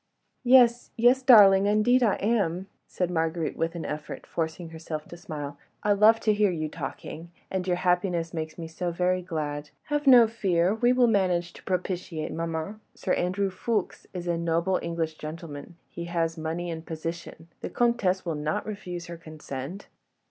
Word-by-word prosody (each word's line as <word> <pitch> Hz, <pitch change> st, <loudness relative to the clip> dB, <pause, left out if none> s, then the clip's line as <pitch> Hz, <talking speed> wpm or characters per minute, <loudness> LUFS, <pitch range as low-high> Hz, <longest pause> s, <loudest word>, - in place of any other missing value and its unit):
"Yes, 245 Hz, -1 st, +5 dB
yes, 245 Hz, +3 st, +5 dB
darling—indeed 210 Hz, 0 st, +6 dB
I 220 Hz, -5 st, +3 dB
am," 195 Hz, -5 st, 0 dB, 0.2 s
said 180 Hz, -1 st, -2 dB
Marguerite 165 Hz, -1 st, -1 dB
with 165 Hz, +1 st, -2 dB
an 170 Hz, -, -5 dB
effort, 150 Hz, 0 st, -6 dB
forcing 165 Hz, +1 st, -4 dB
herself 160 Hz, -1 st, -6 dB
to -, -, -8 dB
smile. 145 Hz, -4 st, -7 dB, 0.2 s
"I 210 Hz, -, +4 dB
love 215 Hz, +3 st, +5 dB
to 215 Hz, -, +3 dB
hear 205 Hz, -1 st, +3 dB
you 155 Hz, -3 st, -2 dB
talking... 160 Hz, +2 st, -7 dB, 0.2 s
and 190 Hz, -1 st, -2 dB
your 180 Hz, -, +2 dB
happiness 180 Hz, -2 st, 0 dB
makes 155 Hz, -1 st, -5 dB
me 165 Hz, -1 st, -6 dB
so 175 Hz, +2 st, -3 dB
very 180 Hz, +1 st, 0 dB
glad.... 150 Hz, -4 st, -4 dB, 0.2 s
Have 295 Hz, -1 st, 0 dB
no 245 Hz, -3 st, +9 dB
fear, 190 Hz, -5 st, +1 dB
we 240 Hz, +2 st, +2 dB
will 250 Hz, -1 st, +4 dB
manage 180 Hz, -6 st, +1 dB
to -, -, -13 dB
propitiate 180 Hz, -3 st, -3 dB
maman. 165 Hz, +5 st, -4 dB
Sir 185 Hz, -, -1 dB
Andrew 190 Hz, +2 st, 0 dB
Ffoulkes 210 Hz, +1 st, -2 dB
is 180 Hz, -2 st, -6 dB
a 170 Hz, -1 st, 0 dB
noble 170 Hz, +2 st, +1 dB
English 165 Hz, -2 st, -3 dB
gentleman; 155 Hz, +1 st, -8 dB
he 170 Hz, -, -7 dB
has 165 Hz, -1 st, -1 dB
money 165 Hz, +2 st, -3 dB
and 160 Hz, -1 st, -6 dB
position, 165 Hz, 0 st, -6 dB
the -, -, -5 dB
Comtesse 215 Hz, -7 st, +1 dB
will 170 Hz, -, -1 dB
not 150 Hz, +1 st, -2 dB
refuse 180 Hz, -5 st, -6 dB
her 170 Hz, -1 st, -8 dB
consent. 155 Hz, +1 st, -7 dB
175 Hz, 170 wpm, -27 LUFS, 160-200 Hz, 0.2 s, no